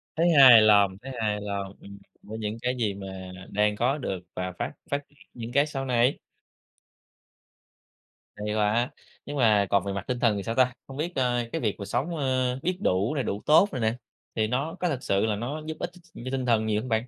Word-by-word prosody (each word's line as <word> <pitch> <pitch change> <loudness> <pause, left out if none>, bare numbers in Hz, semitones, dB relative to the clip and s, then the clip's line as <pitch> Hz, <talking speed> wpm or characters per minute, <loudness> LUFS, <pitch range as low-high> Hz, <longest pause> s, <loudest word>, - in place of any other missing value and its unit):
Thấy 170 +2 +3
hài 130 -7 +9
lòng, 100 -3 +5
thấy 135 +2 -7
hài 105 -2 -1
lòng, 100 -1 -4
ừm, 100 0 -12 0.2
với 110 +1 -7
những 105 0 -3
cái 125 +1 0
gì 110 -4 0
mà 95 -1 -8 0.2
đang 105 0 +1
có 125 +6 +1
được 95 -10 -3 0.2
và 90 0 -3
phát - - -3 0.2
phát 140 - +1
triển 145 - -28 0.2
những 115 0 -7
cái 140 +3 +3
sau 135 -2 -4
này. 125 +1 +2 2.2
Hay 105 0 -3
quá. 110 +4 +1 0.3
Nhưng 145 0 -5
mà 105 -6 +4
còn 100 -2 +3
về 100 0 -3
mặt 100 -1 -4
tinh 125 -1 -2
thần 115 -4 +2
thì 100 - -4
sao 115 - -3
ta? 125 0 +3
Hông 135 - -9
biết, 170 +4 -3
a, 125 -2 +1
cái - - -3
việc 105 -4 0
mà 100 - -5
sống, 130 - -2
ơ, 130 -2 0
biết 180 +1 0
đủ 100 - +1
nè, 140 - 0
đủ 100 -2 -3
tốt 160 +7 +6
nè 130 - -2
nè, 110 0 +1 0.4
thì 110 -1 +1
nó 135 +8 -2
có 180 - 0
thực 135 -5 -3
sự 100 +2 +1
là 110 -2 0
nó 130 +9 -4
giúp 160 0 -5
ích - - -3
ch - - -16
ch 170 - -24 0.2
cho 130 - -4
tinh 130 -1 -2
thần 115 -2 +2
nhiều 105 0 0
hông 130 - -7
bạn? 110 +2 0
115 Hz, 235 wpm, -26 LUFS, 105-135 Hz, 2.2 s, hài